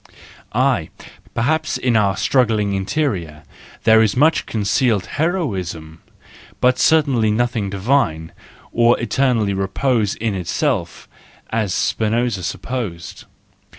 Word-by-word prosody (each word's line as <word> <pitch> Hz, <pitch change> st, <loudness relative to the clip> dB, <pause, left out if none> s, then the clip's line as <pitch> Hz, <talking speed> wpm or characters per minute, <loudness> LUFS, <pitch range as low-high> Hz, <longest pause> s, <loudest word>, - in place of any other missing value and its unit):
Aye, -, -, +1 dB, 0.5 s
perhaps 155 Hz, +5 st, 0 dB
in 125 Hz, -2 st, 0 dB
our 100 Hz, -3 st, +2 dB
struggling 110 Hz, -3 st, +1 dB
interior 95 Hz, -, -2 dB, 0.4 s
there 110 Hz, 0 st, +6 dB
is 110 Hz, +1 st, +1 dB
much 155 Hz, +4 st, +3 dB
concealed 105 Hz, 0 st, +1 dB
heroism, 95 Hz, -, -3 dB, 0.6 s
but 125 Hz, 0 st, +2 dB
certainly 135 Hz, -8 st, +3 dB
nothing 115 Hz, -2 st, 0 dB
divine, 100 Hz, -, 0 dB, 0.4 s
or 120 Hz, 0 st, +3 dB
eternally 120 Hz, -3 st, +1 dB
reposing 105 Hz, +3 st, 0 dB
in 115 Hz, -1 st, -1 dB
itself, 95 Hz, -, -2 dB, 0.4 s
as 110 Hz, -4 st, -1 dB
Spinoza 115 Hz, -2 st, 0 dB
supposed. 105 Hz, -5 st, -5 dB
110 Hz, 100 wpm, -19 LUFS, 95-125 Hz, 0.6 s, there